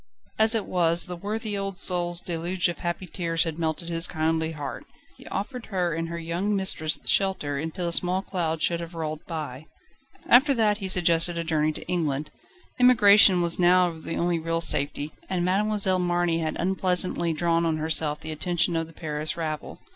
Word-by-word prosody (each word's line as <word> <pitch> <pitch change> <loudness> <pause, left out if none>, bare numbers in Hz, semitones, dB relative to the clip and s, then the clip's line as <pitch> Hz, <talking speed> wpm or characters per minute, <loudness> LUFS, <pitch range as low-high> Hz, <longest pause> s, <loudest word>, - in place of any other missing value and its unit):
As 220 +1 +5
it 220 - -1
was, 170 -1 +2
the 180 - -6
worthy 210 +3 -4
old 195 -1 -4
soul's 175 -2 +1
deluge 175 +2 -1
of 175 - -6
happy 175 +1 -3
tears 165 -2 -1
had 165 -1 -5
melted 160 +1 -2
his 165 0 +4
kindly 160 0 -1
heart. 145 -2 -6 0.3
He - - -15
offered 245 +4 -5
her 180 -4 -1
and 165 +1 -3
her 170 - -5
young 170 +5 -2
mistress 175 -5 0
shelter, 170 -8 0
until 160 +4 -4
the 170 - -1
small 180 +2 +1
cloud 165 -5 -2
should 170 -1 +1
have 170 0 -8
rolled 155 -1 -4
by. 155 -3 -6 0.6
After 270 +3 +5
that 215 -3 +1
he 195 - -4
suggested 170 -2 +1
a 170 - -1
journey 155 -2 0
to - - -7
England. 155 -5 -2 0.5
Emigration 205 -7 +6
now 180 0 +4
was 160 - -13
the - - -4
only 170 -1 0
real 165 +1 -1
safety, 150 -2 0 0.2
and 180 -2 -1
Mademoiselle 195 0 +2
Marny 175 -1 0
had 160 -1 -3
unpleasantly 180 -2 +1
drawn 165 +1 +1
on 160 -1 0
herself 155 -1 +1
the 160 - -6
attention 175 +2 0
of 165 0 -1
the 165 - -16
Paris 155 -1 -4
rabble. 155 -2 -5
170 Hz, 185 wpm, -25 LUFS, 160-185 Hz, 0.6 s, Emigration